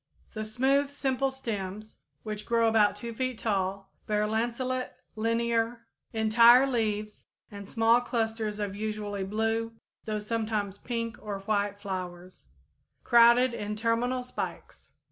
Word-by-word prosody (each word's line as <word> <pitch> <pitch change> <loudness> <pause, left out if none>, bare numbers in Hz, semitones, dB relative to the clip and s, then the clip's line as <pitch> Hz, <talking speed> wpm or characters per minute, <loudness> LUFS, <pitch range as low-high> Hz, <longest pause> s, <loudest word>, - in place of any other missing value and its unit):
_ - - -30
The 215 - -4
smooth, 265 +6 +1
simple 270 -1 0
stems, 215 -5 -5 0.3
which 210 -1 -6
grow 230 -1 +3
about 215 -2 +4
2 230 +3 -6
feet 255 0 -2
tall, 195 -2 -2 0.2
bear 210 0 +1
lanceolate 240 +4 -1 0.3
linear, 230 +1 0 0.3
entire 230 +3 +6
leaves 215 -5 -2 0.3
and 200 -1 -9
small 230 +1 +4
clusters 225 -3 -2
of 205 -2 -3
usually 210 -1 -3
blue, 225 +3 -1 0.3
though 215 -1 -2
sometimes 210 -2 -2
pink 230 -2 -3
or 200 -2 -5
white 205 0 -1
flowers, 185 -2 -7 0.6
crowded 235 +1 +6
in 210 -1 -4
terminal 235 +3 0
spikes. 250 - -7
220 Hz, 125 wpm, -28 LUFS, 210-235 Hz, 0.6 s, entire